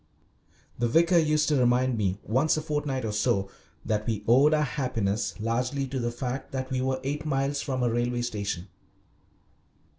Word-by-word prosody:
The 120 - +2
vicar 170 +7 +4
used 155 -1 +2
to 150 - +3
remind 125 +1 +3
me, 100 -3 0
once 135 +9 +2
a - - -1
fortnight 145 -5 -2
or 110 - -1
so, 100 -2 0 0.3
that 105 0 -1
we 110 -3 -1
owed 135 +6 +6
our 155 -1 +3
happiness 120 -8 -2
largely 125 +5 -1
to 135 0 -3
the 120 -1 -1
fact 125 +2 -4
that 130 0 -3
we 130 -1 0
were 130 0 0
eight 145 +3 -2
miles 140 -1 0
from 130 -3 -2
a 120 - +2
railway 120 0 0
station. 100 -5 -3
130 Hz, 175 wpm, -27 LUFS, 115-140 Hz, 0.3 s, owed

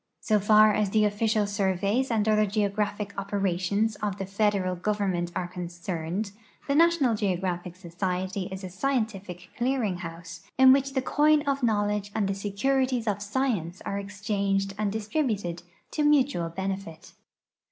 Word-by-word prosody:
So 215 -2 +2
far 215 +1 +6
as 210 -1 +1
the 215 +1 +3
official 210 +1 +1
surveys 200 +4 0
and 220 -2 +1
other 215 -1 +3
geographic 205 0 -1
operations 200 +2 0
of 205 -2 -3
the 195 - -3
federal 195 -2 0
government 185 -2 -1
are 175 - -2
concerned, 175 +2 -4 0.4
the 280 - +1
National 325 -5 +4
Geographic 185 -4 -2
Society 185 +2 -3
is 190 0 -6
a 185 - -5
scientific 195 -6 -3
clear 255 +1 0
ing 190 -4 -1
house 170 +1 -8 0.2
in 260 0 +8
Avhich 275 0 0
the 265 - +1
coin 300 +1 +3
of 280 -1 -1
knoAvledge 210 -3 0
and 210 -3 +1
the 195 - 0
securities 245 +5 0
of 205 -1 0
science 205 -6 -1
are 200 - -2
e.xchanged 200 -1 -1
and 210 -1 -1
distrilmted 210 - -2 0.3
to 305 - -1
mutual 280 - +3
benefit. 190 -2 -5
205 Hz, 150 wpm, -27 LUFS, 185-220 Hz, 0.4 s, in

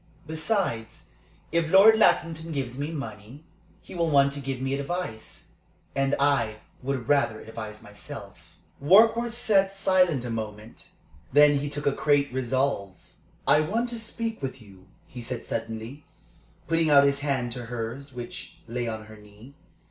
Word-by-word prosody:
"Besides, 155 - -2 0.4
if 165 -1 +1
Lord 195 +5 +8
Lackington 165 -5 +2
gives 135 -5 -3
me 145 +3 -3
money, 125 -2 -8 0.4
he - - -12
will 170 -2 0
want 140 -1 +4
to 140 - -5
give 135 -2 -4
me 135 +1 -2
advice. 140 -5 -5 0.5
And 135 0 +1
I 135 -6 +2 0.3
would 130 -3 -3
rather 140 -7 +2
advise 110 -1 -8
myself." 105 0 -11 0.3
Warkworth 225 +8 +5
sat 195 -5 +2
silent 180 -9 +2
a 120 - -4
moment. 110 0 -7 0.4
Then 145 +1 +6
he 145 +1 -3
took 145 0 -5
a 140 - +4
great 145 -1 +1
resolve. 130 -6 -1 0.5
"I - - +5
want 225 +10 -1
to 235 -1 -4
speak 225 -1 -3
to 130 -1 -4
you," 95 -2 -17 0.2
he 125 - -9
said, 120 0 -5
suddenly, 115 +5 -5 0.6
putting 165 -1 +2
out 140 -1 +7
his 140 0 +2
hand 135 -4 -1
to 120 0 -6
hers, 120 +4 -5
which 120 -2 -8
lay 120 +1 -3
on 110 -1 -5
her 110 0 -13
knee. 105 +5 -16
140 Hz, 155 wpm, -26 LUFS, 115-160 Hz, 0.6 s, Lord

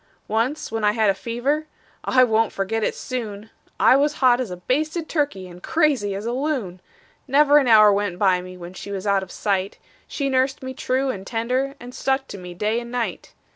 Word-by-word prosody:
Once 235 +7 -1
when 225 -1 -3
I 210 0 +3
had 215 -2 +3
a - - -1
fever 250 +9 -2 0.4
I 255 -1 +4
won't 225 -2 +2
forget 215 +3 -2
it - - 0
soon 220 -4 -6 0.3
I - - +6
was 290 +2 +2
hot 255 -3 +3
as 245 - -4
a 180 - -6
basted 310 - -1
turkey 285 - -1
and 175 0 -13
crazy 275 - +1
as 200 +2 -5
a 235 - -1
loon; 250 - -2 0.5
Never 290 +2 +5
an 270 - 0
hour 215 -3 +7
went 200 -3 -1
by 185 -2 +3
me 185 0 -10
when 175 0 -9
she 195 - -9
was 195 0 -5
out 200 -1 +2
of 190 - -8
sight 195 -2 -1 0.3
She 280 - -2
nursed 265 0 0
me 260 0 -5
true 260 +1 -1
and 195 -4 -8
tender, 255 +4 -1
and 245 +1 -10
stuck 270 +1 0
to 200 - -7
me 180 -1 -9
day 215 +5 0
and 235 0 -8
night. 245 -1 -4
230 Hz, 210 wpm, -22 LUFS, 200-265 Hz, 0.5 s, hour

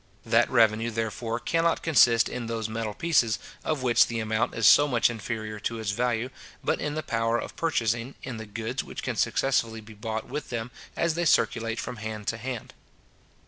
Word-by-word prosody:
That 115 +1 +3
revenue, 115 -1 +3
therefore, 115 +1 -2
cannot 165 +4 +1
consist 120 -7 +5
in 125 -2 -5
those 115 -1 -2
metal 110 -1 -4
pieces, 135 -9 +2 0.3
of 155 -4 -1
which 120 -2 +5
the 115 -1 -3
amount 110 +1 0
is 115 - +1
so 145 +7 +8
much 120 -3 +3
inferior 110 -1 -5
to 115 +2 -3
its 110 -2 -2
value, 120 +2 -1 0.3
but - - 0
in 150 0 -2
the 155 - -2
power 115 0 0
of - - -6
purchasing, 115 -5 -1
in 130 -3 -5
the 110 -1 -7
goods 115 +5 -3
which - - -8
can - - -2
successively 115 -4 +1
be 110 0 -12
bought 110 +1 -4
with 150 -5 -5
them 115 0 -4 0.2
as 170 -1 +1
they 170 +2 -1
circulate 115 -4 +2
from 125 - -5
hand 110 -1 -6
to 115 - -2
hand. 120 0 -6
115 Hz, 190 wpm, -27 LUFS, 110-125 Hz, 0.3 s, so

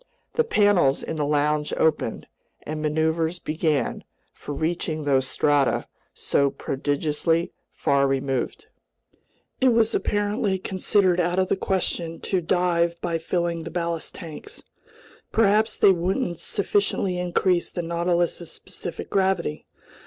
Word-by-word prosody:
The 470 - +3
panels 205 - +3
in 160 - -4
the 150 - 0
lounge 150 0 +1
opened, 155 -8 0 0.4
and 155 0 -4
maneuvers 160 +2 0
began 155 -3 -1 0.3
for - - -8
reaching 155 0 -2
those 135 -2 +2
strata 145 +1 +2 0.3
so 140 0 +1
prodigiously 150 +5 -1 0.2
far 140 0 +2
removed. 135 -1 -2 0.9
It 255 -2 +4
was 225 0 +3
apparently 205 -1 0
considered 185 -1 +1
out 175 +1 +1
of 185 0 +2
the - - +3
question 175 -3 -2
to 190 -2 0
dive 170 -1 +1
by 170 -2 -1
filling 170 0 -1
the 165 - -6
ballast 170 -1 -3
tanks. 165 -5 -9 0.7
Perhaps 220 0 +3
they 195 - +6
wouldn't 180 +1 -1
sufficiently 200 -2 0
increase 180 0 +1
the 175 - -3
Nautilus's 170 0 0
specific 175 - -7
gravity. 190 -5 0
170 Hz, 125 wpm, -24 LUFS, 155-185 Hz, 0.9 s, they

